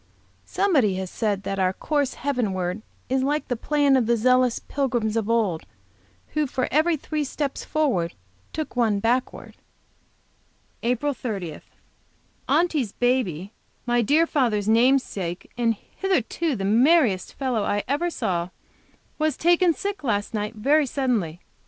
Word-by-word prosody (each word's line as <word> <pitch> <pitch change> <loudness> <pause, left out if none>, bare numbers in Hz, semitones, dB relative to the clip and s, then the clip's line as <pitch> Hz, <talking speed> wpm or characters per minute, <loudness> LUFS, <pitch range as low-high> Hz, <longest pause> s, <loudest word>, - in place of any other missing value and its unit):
Somebody 275 - +2
has 190 -1 -4
said 205 -3 -1
that 195 0 -3
'our 185 0 +2
course 285 +4 -1
heavenward 210 -8 -2 0.3
is 265 +1 +1
like 295 +3 0
the 245 - 0
plan 285 +3 +2
of 250 -4 +2
the 235 0 +3
zealous 255 +1 +3
pilgrims 240 -6 -1
of 225 -1 -1
old, 215 -8 +1 0.7
who 305 -1 0
for 255 0 -1
every 315 +3 +3
three 300 +1 -3
steps 280 0 -3
forward, 250 - 0 0.4
took 310 -4 -5
one 225 -4 +2
backward.' 240 +4 -1 1.2
APRIL 250 +5 0
30. 195 - -5 0.9
Aunty's 305 - +1
baby, 225 -7 0 0.3
my 240 0 +2
dear 300 +9 +3
father's 230 -10 0
namesake, 220 -7 +1
and 230 -1 +1
hitherto 330 - -2
the 195 -3 -3
merriest 235 - +3
little 260 -4 0
fellow - - -1
I 205 0 0
ever 295 +7 0
saw, 175 - -2 0.7
was 310 0 +1
taken 345 +1 +4
sick 400 +2 -4
last 205 -4 -1
night, 210 +1 -3
very 280 +7 +3
suddenly. 230 - -1
245 Hz, 140 wpm, -24 LUFS, 205-290 Hz, 1.2 s, taken